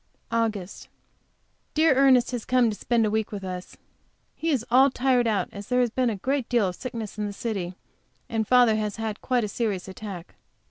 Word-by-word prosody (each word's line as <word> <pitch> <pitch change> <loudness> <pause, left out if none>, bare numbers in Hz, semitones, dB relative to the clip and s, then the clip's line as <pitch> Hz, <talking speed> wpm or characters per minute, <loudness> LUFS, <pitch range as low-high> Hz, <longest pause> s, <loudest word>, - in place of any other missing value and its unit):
AUGUST. 220 -5 -2 0.9
Dear 315 -1 +5
Ernest 260 -2 +4
has 245 -3 -3
come 250 -3 +3
to - - -5
spend 230 +1 +1
a 210 - 0
week 220 0 -1
with 200 -2 -6
us. 185 -1 -7 0.6
He 330 - -3
is 260 -7 0
all 265 +3 +6
tired 250 -2 +2
out, 205 -5 +1
as 200 0 -9
there 250 0 +1
has 245 -2 +2
been 255 +1 +1
a 220 - -2
great 260 +5 -2
deal 235 -5 +3
of 180 - -7
sickness 225 -4 -6
in 210 - -1
the 205 - -5
city, 195 -5 -4 0.5
and 220 -2 -1
father 245 -3 +5
has 210 -1 -2
had 220 -2 -4
quite 250 -2 +1
a - - -1
serious 200 -4 -2
attack. 190 -2 -8
225 Hz, 200 wpm, -25 LUFS, 205-250 Hz, 0.9 s, all